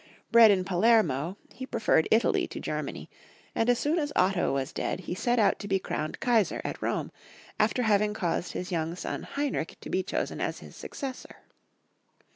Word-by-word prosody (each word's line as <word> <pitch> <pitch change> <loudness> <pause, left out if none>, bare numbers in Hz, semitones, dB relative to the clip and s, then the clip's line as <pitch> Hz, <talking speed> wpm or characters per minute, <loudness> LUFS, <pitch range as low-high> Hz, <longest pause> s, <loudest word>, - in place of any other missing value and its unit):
Bred 230 -1 +8
in 190 -2 +3
Palermo, 180 - +2 0.2
he 260 +1 -7
preferred 210 -10 +2
Italy 225 +2 +3
to - - -7
Germany, - - -4 0.5
and 225 - +1
as 245 - +4
soon 305 +7 +1
as 290 -2 -2
Otto 185 -1 +2
was 135 -1 -2
dead - - -2
he 175 - -5
set 240 +6 0
out 215 -3 +3
to 205 - -6
be 195 -1 +2
crowned 155 -4 -4
Kaisar 225 -8 +2
at - - -4
Rome, - - -2 0.5
after 250 - +2
having 210 -1 +2
caused 175 -3 -2
his 180 0 -5
young 165 -1 -1
son - - -4
Heinrich 280 - -3
to - - -9
be 190 - +2
chosen 185 - -3
as - - -2
his - - -12
successor. 265 -3 -7
200 Hz, 180 wpm, -28 LUFS, 175-235 Hz, 0.5 s, Bred